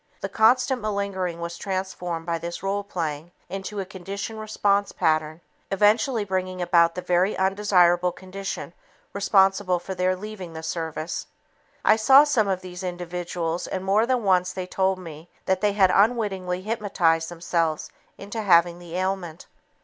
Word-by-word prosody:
The -, -, -3 dB
constant 250 Hz, +2 st, +3 dB
malingering 200 Hz, -4 st, -2 dB
was 170 Hz, 0 st, -5 dB
transformed 185 Hz, -4 st, -4 dB
by 165 Hz, -1 st, -1 dB
this 170 Hz, +2 st, -6 dB
role 200 Hz, +1 st, -1 dB
playing 165 Hz, -5 st, -4 dB, 0.2 s
into 195 Hz, +2 st, -5 dB
a 195 Hz, -, -3 dB
conditioned 195 Hz, +3 st, -6 dB
response 205 Hz, -2 st, +1 dB
pattern, 155 Hz, +1 st, 0 dB, 0.3 s
eventually 210 Hz, +4 st, +2 dB
bringing 185 Hz, -1 st, -2 dB
about 170 Hz, -1 st, +3 dB
the 180 Hz, -, -5 dB
very 180 Hz, +3 st, +1 dB
undesirable 185 Hz, -2 st, +3 dB
condition 190 Hz, -1 st, -7 dB, 0.4 s
responsible 195 Hz, -2 st, +3 dB
for 175 Hz, +2 st, -6 dB
their 185 Hz, 0 st, +1 dB
leaving 190 Hz, -3 st, -8 dB
the 160 Hz, 0 st, -7 dB
service. 160 Hz, 0 st, -4 dB, 0.6 s
I 215 Hz, -, +6 dB
saw 265 Hz, +6 st, +7 dB
some 250 Hz, -8 st, +2 dB
of 190 Hz, -2 st, -1 dB
these 180 Hz, 0 st, -8 dB
individuals 175 Hz, -1 st, -4 dB
and 190 Hz, 0 st, -4 dB
more 210 Hz, +4 st, +3 dB
than 250 Hz, -2 st, +1 dB
once 185 Hz, -2 st, +2 dB
they 185 Hz, 0 st, -5 dB
told 190 Hz, +1 st, 0 dB
me 165 Hz, -2 st, -10 dB, 0.2 s
that 190 Hz, 0 st, +1 dB
they 210 Hz, -1 st, +2 dB
had 190 Hz, -3 st, +4 dB
unwittingly 195 Hz, -5 st, +1 dB
hypnotized 190 Hz, -7 st, +1 dB
themselves 165 Hz, -2 st, -2 dB, 0.3 s
into 210 Hz, +3 st, -5 dB
having 175 Hz, -3 st, +4 dB
the 175 Hz, -1 st, -9 dB
ailment. 185 Hz, -3 st, -3 dB
185 Hz, 150 wpm, -24 LUFS, 175-200 Hz, 0.6 s, saw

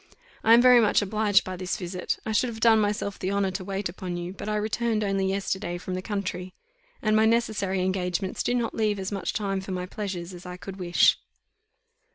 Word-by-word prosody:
I 225 Hz, +1 st, +7 dB
am 240 Hz, -, +5 dB
very 250 Hz, -1 st, +8 dB
much 210 Hz, -1 st, +3 dB
obliged 210 Hz, +1 st, +2 dB
by 185 Hz, -, -5 dB
this 185 Hz, 0 st, -3 dB
visit; 180 Hz, 0 st, -3 dB
I 220 Hz, -, -2 dB
should 225 Hz, +3 st, +2 dB
have 225 Hz, -2 st, -6 dB
done 225 Hz, -1 st, +5 dB
myself 205 Hz, -1 st, -2 dB
the 190 Hz, -, -2 dB
honour 200 Hz, -1 st, +1 dB
to 190 Hz, +1 st, -4 dB
wait 195 Hz, +1 st, -3 dB
upon 180 Hz, 0 st, -5 dB
you, 175 Hz, +1 st, -5 dB
but 205 Hz, -, -6 dB
I 210 Hz, -, 0 dB
returned 215 Hz, +1 st, 0 dB
only 195 Hz, -1 st, 0 dB
yesterday 190 Hz, -2 st, -2 dB
from 180 Hz, +1 st, -6 dB
the 185 Hz, -, -2 dB
country, 185 Hz, -3 st, -4 dB, 0.5 s
and 215 Hz, -1 st, +3 dB
my 220 Hz, 0 st, +5 dB
necessary 215 Hz, -5 st, +1 dB
engagements 185 Hz, 0 st, -1 dB
do 245 Hz, -, 0 dB
not 235 Hz, -2 st, -1 dB
leave 215 Hz, -2 st, 0 dB
as 190 Hz, 0 st, -4 dB
much 195 Hz, -3 st, -2 dB
time 195 Hz, -2 st, -2 dB
for 190 Hz, -, -7 dB
my 180 Hz, 0 st, -3 dB
pleasures 185 Hz, -2 st, -5 dB
as 175 Hz, 0 st, -10 dB
I 180 Hz, 0 st, -7 dB
could 190 Hz, +2 st, -8 dB
wish." 175 Hz, -2 st, +3 dB
195 Hz, 215 wpm, -26 LUFS, 185-215 Hz, 0.5 s, very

